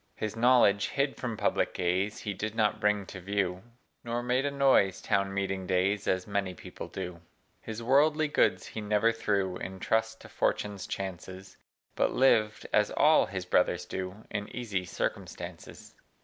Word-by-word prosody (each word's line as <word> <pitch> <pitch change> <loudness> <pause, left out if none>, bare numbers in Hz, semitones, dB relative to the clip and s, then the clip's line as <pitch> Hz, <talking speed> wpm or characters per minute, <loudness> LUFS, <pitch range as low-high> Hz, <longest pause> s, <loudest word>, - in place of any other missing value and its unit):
His 110 -1 -4
knowledge, 115 -4 +4
hid 140 0 -1
from 120 -4 -4
public - - 0
gaze, 95 +4 0
He 105 - -4
did 110 +3 -4
not 105 -1 +1
bring 105 -2 +1
to 95 - -9
view, 95 -1 -1 0.4
Nor 120 +1 -2
made 125 +3 +1
a - - +1
noise, 135 -9 +3
town 100 -2 0
meeting 95 -1 -2
days, 95 +2 +1
As 95 0 +1
many 100 -3 -2
people - - -9
do. 90 -2 -6 0.4
His 110 +1 -6
worldly 150 +5 +4
goods 145 - +2
he 110 - -6
never 105 +2 +2
threw 100 -5 -1
In 95 0 -7
trust 110 +2 0
to - - -11
fortune's 100 -2 -1
chances, 95 0 -6 0.4
But - - +1
lived 110 -5 +3
(as 105 -1 +4
all 155 +1 +4
his 95 -2 -5
brothers 90 0 +2
do) 95 +4 -6
In 105 -1 -3
easy 105 -7 -2
circumstances. - - -6
105 Hz, 165 wpm, -29 LUFS, 95-115 Hz, 0.4 s, knowledge